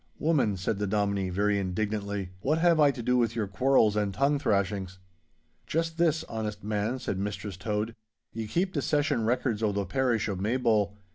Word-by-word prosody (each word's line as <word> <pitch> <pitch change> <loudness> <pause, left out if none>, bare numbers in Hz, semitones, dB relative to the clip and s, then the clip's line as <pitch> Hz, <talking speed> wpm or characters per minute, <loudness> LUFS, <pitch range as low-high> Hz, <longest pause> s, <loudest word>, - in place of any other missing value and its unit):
'Woman,' 140 -11 +1
said 100 +3 -2
the 105 - -1
Dominie, 100 -2 0
very 100 +2 +1
indignantly, 100 0 -2
'what 150 +10 +1
have 170 -1 +4
I 145 -1 +6
to 130 -4 -4
do 125 +2 +2
with 115 -1 +1
your 110 -3 0
quarrels 115 0 +3
and 105 -1 0
tongue 140 +6 +1
thrashings?' 100 -5 -1 0.7
'Just 165 +1 -1
this, 160 -2 +2
honest 105 -2 -5
man,' 105 +4 -1
said 100 -7 -3
Mistress 100 0 -4
Tode; 105 +3 -2 0.4
'ye 110 -1 -4
keep 185 - 0
the 145 - 0
Session 145 -5 +1
records 120 -2 0
o' 110 -2 +2
the 100 0 -1
parish 120 +1 0
o' 100 - -2
Maybole. 105 -1 +1
110 Hz, 185 wpm, -28 LUFS, 100-130 Hz, 0.7 s, I